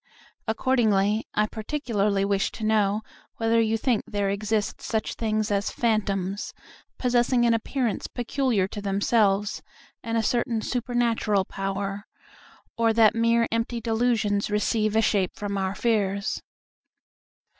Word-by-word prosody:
Accordingly, 220 -3 +2
I 210 - +3
particularly 215 -4 -1
wish 200 -1 +1
to 225 - -7
know 215 -1 +2 0.3
whether 225 0 +2
you 225 0 +1
think 235 -1 +1
there 200 -1 -1
exist 210 0 -1
such 220 -1 -2
things 215 -2 -1
as 200 0 +1
phantoms, 200 -4 -1 0.4
possessing 245 0 +2
an 235 - +4
appearance 230 -1 -1
peculiar 245 -5 0
to 205 - -6
themselves, 200 0 +1 0.4
and 230 0 -2
a 225 - +1
certain 235 -1 0
supernatural 235 -5 0
power, 195 +1 -4 0.7
or 230 -1 +2
that 220 -1 +5
mere 230 0 +2
empty 230 +1 -1
delusions 225 -3 +1
receive 215 +1 +1
a 220 - +4
shape 195 -4 +1
from 205 -1 -4
our 190 0 -1
fears. 200 -4 0
215 Hz, 125 wpm, -25 LUFS, 200-230 Hz, 0.7 s, that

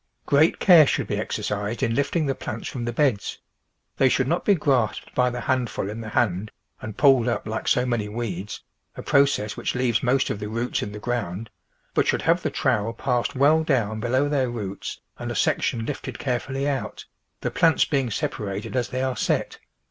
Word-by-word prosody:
Great 145 +3 +4
care 165 -6 +7
should - - 0
be - - -2
exercised 105 +2 -3
in 115 - +1
lifting 140 +5 0
the 135 - +1
plants - - -6
from 120 -3 -4
the 120 - -1
beds; 125 -4 0 0.6
they 135 - +4
should 130 0 +1
not 170 +5 0
be 205 - +4
grasped 130 - 0
by 125 0 +3
the 125 0 -5
handful 120 -6 -1
in 115 +2 -6
the 110 - -6
hand 105 -3 0 0.3
and 110 -1 -7
pulled 130 -3 +5
up 120 - -1
like 110 0 -4
so 125 - +3
many 115 -4 -1
weeds 105 -3 -5 0.2
— - - -47
a - - -6
process 135 -7 +2
which - - -3
leaves 125 -3 +1
most 130 +1 +2
of 100 - -4
the 105 0 -5
roots 115 +3 -2
in 100 - -4
the 105 - -7
ground 110 -2 -3 0.2
— - - -42
but - - +2
should - - +1
have 170 +2 +3
the - - -1
trowel 115 -5 0
passed 125 +2 -1
well 150 +4 +4
down 115 -8 0
below 130 +5 +1
their 135 -4 +1
roots 105 -5 -5 0.2
and - - -4
a - - -4
section 115 -1 0
lifted 145 - -5
carefully 135 +2 -2
out, 140 -3 -3 0.4
the - - -2
plants 165 -1 +4
being 135 -5 0
separated 100 0 -3
as 125 -2 0
they 130 +1 -2
are 130 -1 -1
set. - - -1
120 Hz, 205 wpm, -24 LUFS, 110-135 Hz, 0.6 s, care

